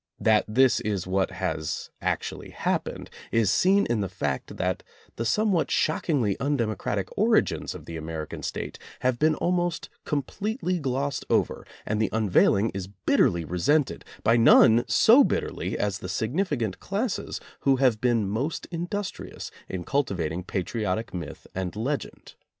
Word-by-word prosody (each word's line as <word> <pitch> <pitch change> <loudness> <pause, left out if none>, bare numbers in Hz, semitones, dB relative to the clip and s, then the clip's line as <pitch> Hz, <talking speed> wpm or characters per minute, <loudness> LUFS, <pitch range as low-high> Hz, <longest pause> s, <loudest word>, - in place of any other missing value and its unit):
That 110 -1 +3
this 120 +2 +4
is 100 -4 -2
what 95 +1 +1
has 75 -1 -3
ac - - +1
tually - - -7
happened, - - -2 0.2
is 115 -4 +3
seen 195 +2 +4
in 115 -3 0
the 95 - -2
fact 75 -7 -3
that 90 0 -1 0.3
the 115 - -3
some 210 - +2
what 170 -4 +1
shockingly 140 - +1
undemocratic 125 -5 -1
origins - - +2
of - - -10
the 85 - -6
American 80 -1 -5
State - - -5 0.2
have 125 -1 +1
been 155 0 +3
almost 175 0 -1
completely 185 - -2
glossed 140 0 -2
over - - 0 0.2
and 110 +1 -1
the 110 - +2
unveiling 105 0 +3
is 95 -1 -4
bitterly 85 -3 +1
resented, 135 - +1 0.2
by 115 +2 +4
none 115 0 +6
so 245 +6 +6
bitterly - - -2
as 100 -1 -1
the 90 - -6
significant 120 - -1
classes 205 +2 -2 0.2
who 135 -1 +3
have 125 -5 +2
been 120 -5 +2
most 120 +11 -2
industrious 180 +4 -5 0.2
in 90 -2 -4
cultivating 90 - -1
patriotic 100 +3 -2
myth 85 -6 -6
and 95 -1 -3
legend. 135 +7 -4
115 Hz, 145 wpm, -26 LUFS, 95-150 Hz, 0.3 s, none